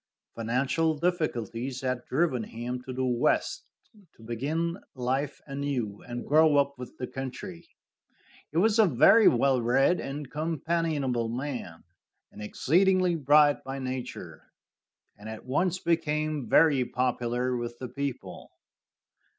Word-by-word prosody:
Financial 135 Hz, +7 st, 0 dB
difficulties 130 Hz, -, -2 dB
had 130 Hz, -2 st, -2 dB
driven 135 Hz, -4 st, +1 dB
him 120 Hz, +3 st, -5 dB
to -, -, -4 dB
the 130 Hz, +1 st, -2 dB
West, 125 Hz, -, 0 dB, 0.5 s
to 115 Hz, -, -17 dB
begin 155 Hz, -, -2 dB, 0.2 s
life 130 Hz, +3 st, -2 dB
anew 135 Hz, -7 st, -3 dB
and 120 Hz, 0 st, -5 dB
grow 155 Hz, 0 st, +5 dB
up 140 Hz, 0 st, +2 dB
with 125 Hz, -, -9 dB
the 125 Hz, -, -3 dB
country. 165 Hz, +8 st, -7 dB, 0.8 s
He 155 Hz, -, -4 dB
was 215 Hz, +5 st, +3 dB
a 215 Hz, -, +7 dB
very 165 Hz, -, +6 dB
well 130 Hz, +1 st, +3 dB
read 135 Hz, +9 st, +3 dB
and 140 Hz, +1 st, -5 dB
companionable 155 Hz, -6 st, -1 dB
man, 120 Hz, -, -5 dB, 0.5 s
and 105 Hz, -, -11 dB
exceedingly 180 Hz, -, +2 dB
bright 145 Hz, -1 st, +4 dB
by 135 Hz, +1 st, -5 dB
nature, 130 Hz, -1 st, -6 dB, 0.7 s
and 105 Hz, +2 st, -9 dB
at 110 Hz, -, -8 dB
once 175 Hz, +8 st, 0 dB
became 155 Hz, -6 st, -1 dB
very 145 Hz, -6 st, +5 dB
popular 125 Hz, 0 st, -1 dB
with 120 Hz, 0 st, -4 dB
the 130 Hz, -, -6 dB
people. 140 Hz, 0 st, -6 dB
135 Hz, 125 wpm, -28 LUFS, 125-155 Hz, 0.8 s, a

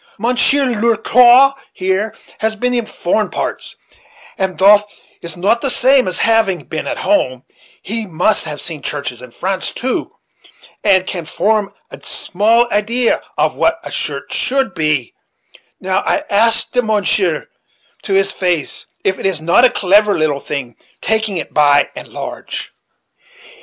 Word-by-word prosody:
Mounsheer 250 Hz, +5 st, +2 dB, 0.2 s
Ler 230 Hz, -1 st, +3 dB
Quaw, 250 Hz, +4 st, +6 dB, 0.2 s
here, 190 Hz, +4 st, -1 dB, 0.2 s
has 220 Hz, 0 st, -1 dB
been 250 Hz, +3 st, -1 dB
in 240 Hz, -3 st, -1 dB
foreign 205 Hz, +4 st, -1 dB
parts; -, -, -4 dB, 0.6 s
and 190 Hz, -2 st, -2 dB
thof 205 Hz, +2 st, +5 dB
that -, -, -24 dB, 0.3 s
is 170 Hz, 0 st, -7 dB
not 205 Hz, +6 st, +1 dB
the 275 Hz, -, 0 dB
same 260 Hz, 0 st, +3 dB
as 185 Hz, -, -2 dB
having 225 Hz, -5 st, +2 dB
been 160 Hz, -, -5 dB
at -, -, -3 dB
home, 130 Hz, -, 0 dB
yet -, -, -37 dB, 0.3 s
he 225 Hz, +2 st, -4 dB
must 180 Hz, +5 st, +1 dB
have 150 Hz, -2 st, -6 dB
seen 160 Hz, -4 st, -6 dB
churches 140 Hz, -5 st, -4 dB
in 125 Hz, -, -11 dB
France 190 Hz, +10 st, -3 dB
too, 255 Hz, +1 st, -3 dB, 0.7 s
and 190 Hz, -2 st, +3 dB
can 175 Hz, -3 st, -4 dB
form 210 Hz, +5 st, 0 dB, 0.2 s
a -, -, -12 dB
small 225 Hz, +5 st, +1 dB
idee 230 Hz, +4 st, +1 dB, 0.3 s
of -, -, +1 dB
what -, -, +1 dB
a -, -, -8 dB
church -, -, -4 dB
should 265 Hz, -5 st, 0 dB
be; 155 Hz, -7 st, -1 dB, 0.7 s
now 190 Hz, +1 st, 0 dB
I 295 Hz, -, -1 dB
ask 225 Hz, +3 st, +2 dB
the 250 Hz, -, +2 dB
mounsheer 215 Hz, -, 0 dB, 0.5 s
to 195 Hz, -, -3 dB
his 195 Hz, 0 st, +2 dB
face 175 Hz, -6 st, -2 dB, 0.2 s
if 190 Hz, -, 0 dB
it -, -, 0 dB
is 185 Hz, -5 st, -1 dB
not 170 Hz, +10 st, +4 dB
a -, -, +6 dB
clever 205 Hz, +1 st, +3 dB
little 155 Hz, -3 st, 0 dB
thing, 140 Hz, -5 st, -6 dB, 0.2 s
taking 220 Hz, -2 st, -1 dB
it -, -, -6 dB
by 145 Hz, -1 st, +4 dB
and -, -, -8 dB
large." -, -, -7 dB
200 Hz, 160 wpm, -16 LUFS, 175-230 Hz, 0.7 s, Quaw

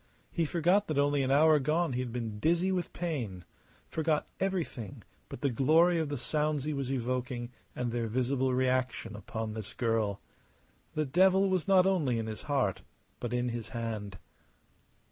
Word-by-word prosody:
He 170 Hz, -, 0 dB
forgot 175 Hz, +6 st, +2 dB
that 155 Hz, -, -2 dB
only 145 Hz, 0 st, +3 dB
an 130 Hz, -, 0 dB
hour 150 Hz, +2 st, +5 dB
gone 155 Hz, +2 st, +1 dB
he 125 Hz, -, -1 dB
had 125 Hz, -2 st, -3 dB
been 115 Hz, -3 st, -4 dB
dizzy 175 Hz, -, +2 dB
with 180 Hz, -2 st, -1 dB
pain, 120 Hz, -, -4 dB, 0.4 s
forgot 155 Hz, -1 st, 0 dB
everything 175 Hz, -, -3 dB, 0.3 s
but -, -, -8 dB
the 140 Hz, -, +1 dB
glory 165 Hz, +7 st, +4 dB
of 160 Hz, -2 st, -1 dB
the 145 Hz, -, -2 dB
sounds 150 Hz, +2 st, 0 dB
he 155 Hz, +1 st, -2 dB
was 135 Hz, -2 st, -2 dB
evoking 125 Hz, -1 st, -2 dB, 0.2 s
and 125 Hz, -1 st, -2 dB
their 115 Hz, -1 st, -1 dB
visible 130 Hz, +3 st, 0 dB
reaction 125 Hz, -3 st, 0 dB
upon 110 Hz, +2 st, -5 dB
this 110 Hz, -2 st, -6 dB
girl. 110 Hz, -4 st, 0 dB, 0.8 s
The 155 Hz, 0 st, +1 dB
devil 190 Hz, +6 st, +4 dB
was 185 Hz, -2 st, 0 dB
not 190 Hz, -2 st, +6 dB
only 160 Hz, -11 st, +2 dB
in 115 Hz, -, -2 dB
his 110 Hz, -1 st, -6 dB
heart, 130 Hz, -10 st, +1 dB, 0.4 s
but 120 Hz, -, -4 dB
in 125 Hz, 0 st, 0 dB
his 115 Hz, -1 st, -5 dB
hand. 105 Hz, -4 st, -4 dB
130 Hz, 170 wpm, -31 LUFS, 115-160 Hz, 0.8 s, not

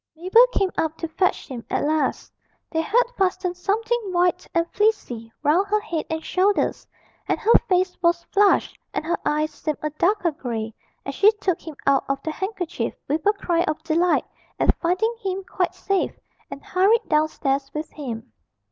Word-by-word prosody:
Mabel 375 Hz, +9 st, +5 dB
came 390 Hz, -6 st, +1 dB
up 320 Hz, 0 st, -1 dB
to 330 Hz, -, -3 dB
fetch 370 Hz, +3 st, 0 dB
him 245 Hz, -4 st, -7 dB
at -, -, 0 dB
last; 305 Hz, +1 st, 0 dB, 0.4 s
they 320 Hz, -, +1 dB
had 455 Hz, +9 st, +3 dB, 0.2 s
fastened 370 Hz, -1 st, 0 dB
something 440 Hz, +6 st, 0 dB
white 355 Hz, 0 st, +1 dB
and 335 Hz, -1 st, +2 dB
fleecy 255 Hz, -, 0 dB
round 345 Hz, +7 st, +3 dB
her 425 Hz, +1 st, +2 dB
head 345 Hz, -7 st, -4 dB
and 320 Hz, 0 st, -3 dB
shoulders, 395 Hz, +2 st, +1 dB, 0.4 s
and -, -, 0 dB
her 460 Hz, +1 st, +4 dB, 0.2 s
face 365 Hz, 0 st, +2 dB
was 340 Hz, 0 st, +2 dB
flushed 405 Hz, 0 st, +3 dB, 0.2 s
and -, -, -2 dB
her 340 Hz, -, 0 dB
eyes 305 Hz, +1 st, 0 dB
seemed 305 Hz, -2 st, -3 dB
a 305 Hz, -, -1 dB
darker 350 Hz, +3 st, +1 dB
grey 225 Hz, -6 st, -4 dB, 0.3 s
as 275 Hz, -, -4 dB
she 400 Hz, +8 st, +6 dB
took 385 Hz, -5 st, -1 dB
him 320 Hz, -3 st, -8 dB
out 275 Hz, -1 st, +4 dB
of 275 Hz, 0 st, 0 dB
the 315 Hz, -, -2 dB
handkerchief, 375 Hz, -1 st, -3 dB
with 305 Hz, +2 st, -1 dB
a 415 Hz, -, +5 dB
cry 350 Hz, -4 st, 0 dB
of 310 Hz, 0 st, -3 dB
delight 335 Hz, +2 st, +2 dB, 0.3 s
at -, -, +3 dB
finding 370 Hz, +7 st, +1 dB
him 385 Hz, 0 st, -3 dB
quite 365 Hz, -1 st, -2 dB
safe, 385 Hz, 0 st, -1 dB, 0.3 s
and 280 Hz, -, -8 dB
hurried 395 Hz, +5 st, +3 dB
downstairs 285 Hz, -3 st, 0 dB
with 305 Hz, +1 st, -4 dB
him. 235 Hz, -, -7 dB
350 Hz, 175 wpm, -23 LUFS, 310-390 Hz, 0.4 s, she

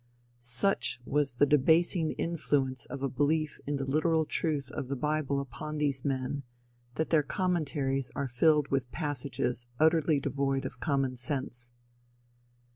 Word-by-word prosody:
Such 125 Hz, +1 st, +2 dB
was 145 Hz, -2 st, +1 dB
the 135 Hz, -, +5 dB
debasing 160 Hz, +3 st, +3 dB
influence 140 Hz, -6 st, -1 dB
of 140 Hz, -1 st, -6 dB
a -, -, +2 dB
belief 150 Hz, +3 st, 0 dB
in 145 Hz, -, 0 dB
the 135 Hz, -1 st, -2 dB
literal 155 Hz, +3 st, +2 dB
truth 145 Hz, -4 st, -1 dB
of 140 Hz, -, -4 dB
the 140 Hz, -, -2 dB
bible 150 Hz, 0 st, 0 dB
upon 140 Hz, +3 st, -6 dB
these 140 Hz, -3 st, 0 dB
men, 135 Hz, 0 st, -1 dB, 0.5 s
that 160 Hz, -, -1 dB
their 160 Hz, -2 st, +5 dB
commentaries 145 Hz, -6 st, -1 dB
are 140 Hz, -1 st, -1 dB
filled 150 Hz, +4 st, +3 dB
with 135 Hz, -3 st, -1 dB
passages 130 Hz, -5 st, -2 dB
utterly 160 Hz, -1 st, +4 dB
devoid 135 Hz, -1 st, -1 dB
of -, -, -6 dB
common 135 Hz, -3 st, 0 dB
sense. 125 Hz, -2 st, -3 dB
140 Hz, 140 wpm, -30 LUFS, 130-155 Hz, 0.5 s, the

